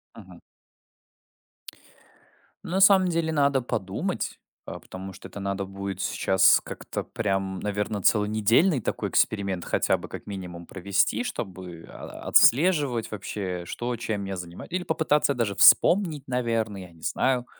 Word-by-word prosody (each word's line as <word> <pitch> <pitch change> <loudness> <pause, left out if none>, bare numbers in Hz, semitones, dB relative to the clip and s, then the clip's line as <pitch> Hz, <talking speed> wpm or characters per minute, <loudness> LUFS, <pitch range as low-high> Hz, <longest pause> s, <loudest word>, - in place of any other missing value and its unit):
Мгм. - - -13 2.2
На 185 +3 -2
самом 190 -2 +6
деле, 165 -2 0
надо 140 -3 +2
подумать, 95 -5 -3 0.3
э, - - -7
потому 95 +1 -9
что - - -11
это 100 - -10
надо 100 0 -3
будет 100 0 -6
сейчас 95 -1 +4
как-то - - -6
прям, 95 -3 -2
наверно, 105 0 -3
целонедельный 110 - +3
такой - - -3
эксперимент 100 -4 0
хотя - - +1
бы - - -9
как - - -9
минимум 90 -4 -8
провести, 100 - 0
чтобы, 90 - -7
а, - - -10
отслеживать 140 -6 +4
вообще, 95 -3 -5
что, 120 +6 -4
чем 110 -3 -4
я 95 0 -4
занима 85 -1 -8
или 180 0 -3
попытаться 150 -4 +1
даже 115 -6 -2
вспомнить, 170 - +5
наверно, 115 -4 -1
я 90 -2 -10
не 80 -1 -20
знаю, 125 -2 0
105 Hz, 135 wpm, -25 LUFS, 95-135 Hz, 2.2 s, самом